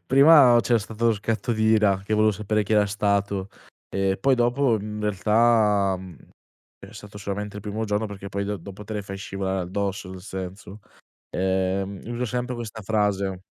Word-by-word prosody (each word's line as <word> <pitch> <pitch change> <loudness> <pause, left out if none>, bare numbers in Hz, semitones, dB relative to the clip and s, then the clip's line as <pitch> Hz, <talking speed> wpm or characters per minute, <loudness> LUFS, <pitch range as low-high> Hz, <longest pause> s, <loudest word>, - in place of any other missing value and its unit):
prima 135 -3 +7
c'era 120 +2 +2
stato 110 +2 -3
lo 115 - +5
scatto 110 +2 -2
d'ira 110 -3 +3
che 105 - -4
volevo 110 0 +4
sapere 105 +1 -1
chi 105 +2 0
era 105 -1 +5
stato, 100 -1 -1 0.4
e 95 0 0
poi 135 +6 +4
dopo, 120 0 +2
mhmm, 100 - -7
in - - -5
realtà, 105 -1 +3
mhmm, 90 -3 -11 0.6
è - - -13
stato 105 0 -11
solamente 105 0 -5
il 105 - -7
primo 105 +1 -3
giorno 105 +1 -1
perché 100 -1 -8
poi 100 +1 -2
do 105 +1 -3
dopo 100 +1 -10
te 110 +1 -7
le 105 - -2
fai 100 0 -7
scivolare 95 0 -3
addosso, 95 +1 -3
nel 95 -1 -9
senso. 95 +2 -8 0.5
Ehm, 95 +1 -1
uso 120 +1 -3
sempre 125 +1 -3
questa 110 -2 -7
frase. 100 -3 0
105 Hz, 180 wpm, -24 LUFS, 95-110 Hz, 0.6 s, prima